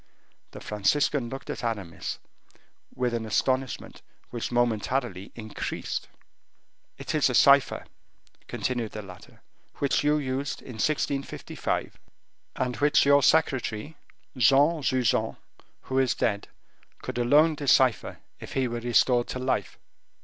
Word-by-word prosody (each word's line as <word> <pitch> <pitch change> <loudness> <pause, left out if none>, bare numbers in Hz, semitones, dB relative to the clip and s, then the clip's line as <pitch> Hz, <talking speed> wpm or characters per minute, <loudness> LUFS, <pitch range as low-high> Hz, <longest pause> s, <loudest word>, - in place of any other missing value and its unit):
The - - -10
Franciscan 120 +5 0
looked 135 +2 -6
at - - -6
Aramis 100 -8 -4 0.8
with 125 -1 -1
an 115 -1 -2
astonishment 130 +4 -1 0.3
which 120 0 -4
momentarily 120 -3 -1
increased. 110 -2 -5 0.9
"It - - -5
is - - +3
a - - -1
cipher," - - +5 0.6
continued 120 -4 -3
the 105 - -6
latter, 90 -2 -14 0.3
"which 140 0 0
you 150 +1 +3
used 135 -1 -3
in 125 -4 -9
1655, 140 -2 -2 0.6
and 125 -1 -2
which 145 0 +4
your 140 0 +6
secretary, 135 -2 +1 0.4
Juan 145 +5 +4
Jujan, 130 -4 +1 0.4
who 130 0 -1
is 130 -2 +2
dead, 100 -1 -1 0.6
could - - -4
alone 150 +7 +4
decipher, 130 -5 +2 0.2
if - - -9
he 130 -1 +1
were 120 0 -4
restored 120 +1 +2
to - - -4
life." 130 +1 -2
130 Hz, 120 wpm, -27 LUFS, 115-140 Hz, 0.9 s, your